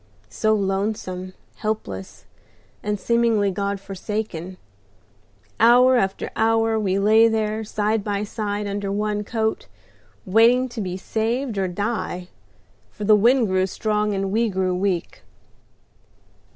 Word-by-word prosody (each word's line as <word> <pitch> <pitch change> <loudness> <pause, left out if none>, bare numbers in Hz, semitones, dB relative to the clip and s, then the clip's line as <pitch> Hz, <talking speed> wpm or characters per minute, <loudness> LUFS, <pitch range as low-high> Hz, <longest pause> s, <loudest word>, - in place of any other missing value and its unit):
so 215 0 +1
lonesome, 195 -2 -2 0.2
helpless, 155 - -5 0.6
and 210 -1 -2
seemingly 230 -4 +2
God 200 +1 -2
forsaken. 195 -2 -5 1.0
Hour 250 +3 +6
after 195 -5 -1
hour 225 0 +2
we 195 -2 0
lay 215 +3 +5
there 220 -1 -1
side 215 0 -1
by 205 0 -2
side 210 -1 -3
under 200 0 -3
one 210 +1 -1
coat, 220 0 -2 0.6
waiting 230 +6 +4
to 235 -2 -5
be 185 -2 -4
saved 225 +5 -2
or 190 - +1
die, 185 -2 -3 0.6
for 210 - -8
the 215 +1 +6
wind 235 +4 +4
grew 185 0 +1
strong 210 +1 -1
and 195 0 -2
we 225 +2 +1
grew 190 -1 0
weak." 185 -2 -2
210 Hz, 125 wpm, -22 LUFS, 195-220 Hz, 1.0 s, Hour